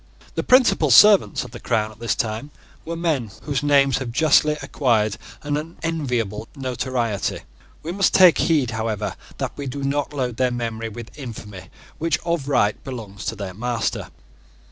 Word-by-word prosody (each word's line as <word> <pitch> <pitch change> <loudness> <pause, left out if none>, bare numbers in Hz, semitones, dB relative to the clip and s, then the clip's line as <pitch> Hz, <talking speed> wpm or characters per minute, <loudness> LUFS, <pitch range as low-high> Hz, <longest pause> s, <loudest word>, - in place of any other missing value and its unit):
The - - -1
principal 250 - +4
servants 205 - +6
of - - -10
the - - -9
crown 110 0 0
at 110 - -17
this 115 0 0
time 110 +5 -3 0.4
were 170 - -4
men 160 -9 -1
whose 145 -2 -1
names 140 -2 +3
have 130 -3 -4
justly 150 +2 +3
acquired 110 -7 +1 0.3
an 145 0 -2
unenviable 140 - -3
notoriety. 125 -5 -2 0.4
We 165 - -4
must 195 +2 +2
take 185 -3 +7
heed, 145 -7 +2
however, 110 -3 -2 0.2
that - - -3
we 140 -1 -5
do 140 +2 -5
not 140 +1 -1
load 125 -5 -3
their 130 -1 +2
memory 115 -2 -3
with 115 +1 -10
infamy 105 -7 -8 0.3
which 165 +1 +1
of 170 -5 -1
right 105 -7 +1
belongs 110 -7 -7
to 110 - -2
their 100 -3 -6
master. 115 +3 -2
125 Hz, 165 wpm, -22 LUFS, 110-150 Hz, 0.4 s, take